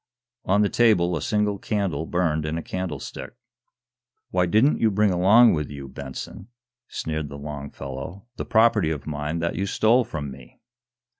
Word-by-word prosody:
On 100 +3 +3
the 100 - +2
table 90 -7 +3
a 80 - -3
single 105 0 0
candle 95 -8 -2
burned 80 -3 0
in 80 +1 -2
a 85 - -4
candlestick. 90 - -6 1.0
"Why 90 -1 +2
didn't 110 - +3
you 110 - +4
bring 105 0 +2
along 100 +7 +6
with 75 -2 -2
you, 70 -1 -8
Benson," 65 +7 -8 0.4
sneered 80 -2 -4
the 70 - -8
long 70 -1 -6
fellow, 70 - -8
"the - - -5
property 110 -6 +3
of 75 -4 -4
mine 75 +1 -3
that 85 - -1
you 100 - -2
stole 115 +5 +3
from 75 - -5
me?" 65 -1 -14
85 Hz, 165 wpm, -24 LUFS, 75-105 Hz, 1.0 s, along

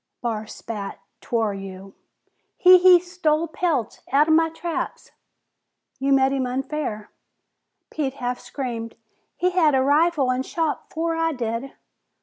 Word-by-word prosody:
Barr 220 -3 -3
spat, 210 -3 -7 0.2
"'Twar 225 -3 -1
you!" 195 0 -9 0.6
"He 365 -1 +8
he 365 -1 +7
stole 335 -3 0
pelts 310 - -2
out'en 300 +4 +4
my 325 0 +3
traps!" 330 +1 -5 0.9
"You 275 +1 0
met 270 0 +4
him 265 -2 -1
unfair!" 260 -4 -4 0.8
Pete 275 -4 -2
half 245 -2 -3
screamed. 235 -4 -5 0.4
"He 365 +1 +1
had 320 -6 +3
a 260 - +3
rifle 290 -1 +3
an' 255 +1 0
shot 320 +3 -2
afore 330 +1 -2
I 325 0 0
did!" 235 +1 -4
275 Hz, 135 wpm, -23 LUFS, 240-325 Hz, 0.9 s, He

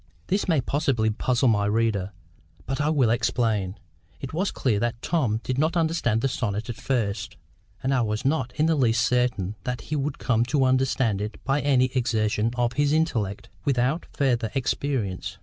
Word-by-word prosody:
This 200 +2 +1
may 160 -6 +3
possibly 130 -6 +1
puzzle 125 +4 +1
my 105 -2 +2
reader; 105 -3 0 0.5
but 135 +2 -2
I 145 - +1
will 135 -8 +3
explain. 110 -5 0 0.4
It 135 - -7
was 185 +5 0
clear 110 -6 0
that 115 0 -1
Tom 125 -10 0
did 130 +1 -2
not 160 +4 +1
understand 160 -9 +1
the 135 - +2
sonnet 115 -2 -2
at - - -7
first; 110 -4 -2 0.5
and 135 +1 +1
I 130 - +2
was 105 0 -2
not 135 -3 +1
in 155 - +2
the 165 - +3
least 120 -5 +2
certain 125 -6 +1
that 125 -1 -3
he 155 - -4
would 145 0 -2
come 115 -2 +1
to 135 +1 +2
understand 130 -5 +1
it 105 +1 -4
by 140 +1 +1
any 130 -3 +3
exertion 110 -3 +1
of 120 0 0
his 145 +3 +2
intellect, 115 - -1
without 135 +4 0
further 120 -6 +1
experience. 130 -7 -2
125 Hz, 180 wpm, -25 LUFS, 110-140 Hz, 0.5 s, may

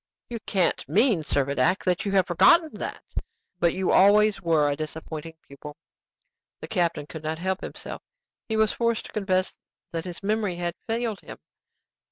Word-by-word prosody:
"You 235 - -3
can't 185 -3 0
mean, 220 -4 +3
Servadac, 145 +5 +1
that 180 0 0
you - - 0
have 190 -2 +4
forgotten 195 - +5
that? - - -5 0.6
But 170 -2 +2
you 190 -1 0
always 205 +1 +5
were 160 -4 +3
a 145 - 0
disappointing 155 +1 -6
pupil." 145 +2 -11 0.8
The - - -7
captain 170 -7 0
could 160 +1 -9
not 155 +1 -3
help 190 +2 -2
himself: - - -7 0.5
he 220 - 0
was 220 -1 +3
forced 235 -1 0
to - - -11
confess 190 -3 -1 0.3
that 165 -1 -4
his 180 +1 -7
memory 210 -2 0
had 175 0 -2
failed 225 -2 -1
him. - - -10
185 Hz, 165 wpm, -26 LUFS, 160-210 Hz, 0.8 s, forgotten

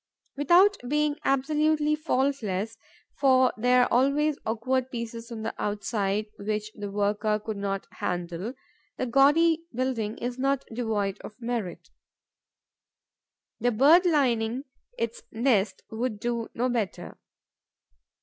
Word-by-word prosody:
Without 355 +8 +5
being 300 +1 +1
absolutely 300 +2 +2
faultless, 250 - -1 0.4
for 260 -2 +4
there 250 +2 +4
are - - -1
always 280 +4 +3
awkward 255 +3 0
pieces 235 -1 -6
on 220 -2 -6
the 225 - -3
outside, 205 0 -1
which 210 +1 -3
the 205 -1 -6
worker 210 +1 0
could 215 0 -5
not 195 -1 -3
handle, 175 +6 -4 0.4
the - - -1
gaudy 315 +6 +4
building 235 -3 -2
is 245 +1 -4
not 275 0 0
devoid 210 -4 -1
of 215 - -11
merit. 215 -8 -4 1.7
The 245 - +2
bird 305 - +6
lining 250 -5 +1 0.3
its 230 0 -3
nest 220 -5 +1
would 220 -1 -2
do 235 0 -2
no 245 +2 +1
better. 230 -7 -3
240 Hz, 120 wpm, -27 LUFS, 215-275 Hz, 1.7 s, bird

